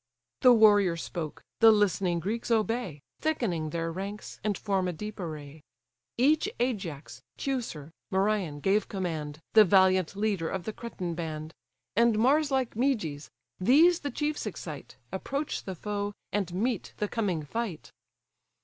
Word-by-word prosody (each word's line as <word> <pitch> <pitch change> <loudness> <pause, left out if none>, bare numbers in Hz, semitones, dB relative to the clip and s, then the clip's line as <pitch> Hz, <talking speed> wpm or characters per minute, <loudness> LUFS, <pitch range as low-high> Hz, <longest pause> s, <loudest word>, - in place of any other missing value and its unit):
The 250 - +8
warrior 205 -6 +6
spoke; 160 -1 -5 0.2
the 225 -1 +8
listening 195 -4 +2
Greeks 220 +8 -3
obey, 220 - 0 0.2
Thickening 210 - -1
their 165 +1 -2
ranks, 195 +4 -6
and 210 -3 0
form 195 -3 0
a 180 - -2
deep 210 +6 -7
array. 155 -3 -7 0.6
Each 295 +6 +3
Ajax, 190 - -3 0.2
Teucer, 230 - -3 0.2
Merion 190 -6 0
gave 195 +4 +2
command, 160 -6 -4
The 220 - +9
valiant 190 -2 +4
leader 200 -5 0
of 190 -2 -3
the 220 - -4
Cretan 185 -8 -5
band; 160 -1 -5 0.4
And 230 0 +4
Mars 280 +6 +3
like 265 -3 0
Meges: 210 - -1 0.3
these 315 - +5
the 285 - -3
chiefs 295 -4 -2
excite, 160 -7 -7 0.2
Approach 275 +10 -3
the 190 - -4
foe, 205 +3 -3 0.2
and 195 -4 -1
meet 215 +4 -2
the 210 - -1
coming 195 -9 -1
fight. 200 +2 -4
200 Hz, 140 wpm, -29 LUFS, 170-230 Hz, 0.6 s, The